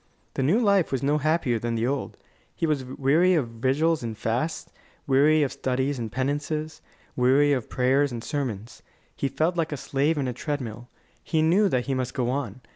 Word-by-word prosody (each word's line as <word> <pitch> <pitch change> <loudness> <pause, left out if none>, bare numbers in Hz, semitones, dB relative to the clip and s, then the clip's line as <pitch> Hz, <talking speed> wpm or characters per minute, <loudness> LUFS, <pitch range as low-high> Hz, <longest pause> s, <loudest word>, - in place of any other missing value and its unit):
The - - -2
new 160 - +3
life 200 -6 +3
was 135 0 -1
no 145 +2 +2
happier 150 -6 +1
than 115 +1 -2
the 115 +1 0
old. 135 +2 -3 0.4
He - - -1
was 150 -4 0
weary 145 +8 +2
of 145 -7 +1
vigils 135 +8 +1
and 115 -2 -5
fasts, 125 +10 -2 0.3
weary 145 +3 +4
of 140 - -1
studies 130 0 -1
and 115 -2 -4
penances, 145 +4 -2 0.3
weary 135 +3 +4
of 125 -5 -2
prayers 135 +2 +2
and 115 -2 -6
sermons. 120 -8 -4 0.3
He 140 - -1
felt 165 +5 0
like 165 -2 0
a 145 - -3
slave 145 +4 0
in 135 -3 -1
a 125 - -2
treadmill. 125 -3 -5 0.3
He 160 -2 +1
knew 190 +6 +4
that 125 -5 0
he 140 - -1
must 130 -1 -3
go 125 -2 0
on. 130 -4 -4
140 Hz, 195 wpm, -25 LUFS, 125-155 Hz, 0.4 s, weary